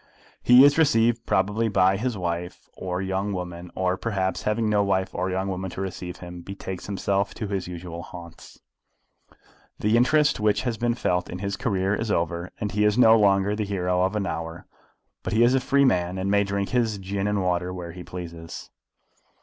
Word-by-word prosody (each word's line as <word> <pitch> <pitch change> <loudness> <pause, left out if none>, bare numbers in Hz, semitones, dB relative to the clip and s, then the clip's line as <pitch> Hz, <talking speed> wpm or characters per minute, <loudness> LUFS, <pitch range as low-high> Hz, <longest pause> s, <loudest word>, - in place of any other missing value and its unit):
He 125 +2 +8
is 145 +2 +4
received 115 -5 +3
probably 105 +4 +1
by 95 -2 +3
his 115 +2 -2
wife 90 0 -4
or 90 0 -3
young 95 +2 -2
woman, 90 -1 -6
or 95 0 0
perhaps, 95 -2 -2
having 110 +1 0
no 105 -1 +3
wife 95 -1 0
or 90 +1 -1
young 95 +1 -1
woman 95 0 -3
to 95 - -6
receive 90 -2 -5
him, 90 0 -9
betakes 95 0 -7
himself 100 0 -1
to 110 - -4
his 95 -3 -3
usual 85 -1 -7
haunts. 85 0 -12 1.2
The 105 +2 +1
interest 150 +4 +3
which 105 -1 +1
has 115 -3 -2
been 120 0 +1
felt 90 -6 -1
in 90 - -5
his 100 +1 -3
career 100 -5 0
is 110 +2 -2
over, 85 -1 -1
and 105 - -2
he 105 +2 +1
is 105 +1 +3
no 115 -3 +7
longer 100 -1 +3
the 105 - -1
hero 90 -3 0
of 95 +3 +1
an 105 -2 -1
hour; 80 -1 -5 0.6
but - - -4
he 110 +2 +4
is 120 +2 +4
a 135 - +4
free 140 +2 +3
man, 90 -6 +1
and 95 +1 -1
may 100 0 +4
drink 100 0 -2
his 115 -4 +1
gin 100 +1 -3
and 105 -2 0
water 90 0 0
where 90 -2 -6
he 90 +1 -9
pleases. 85 -2 -8
95 Hz, 200 wpm, -25 LUFS, 90-105 Hz, 1.2 s, He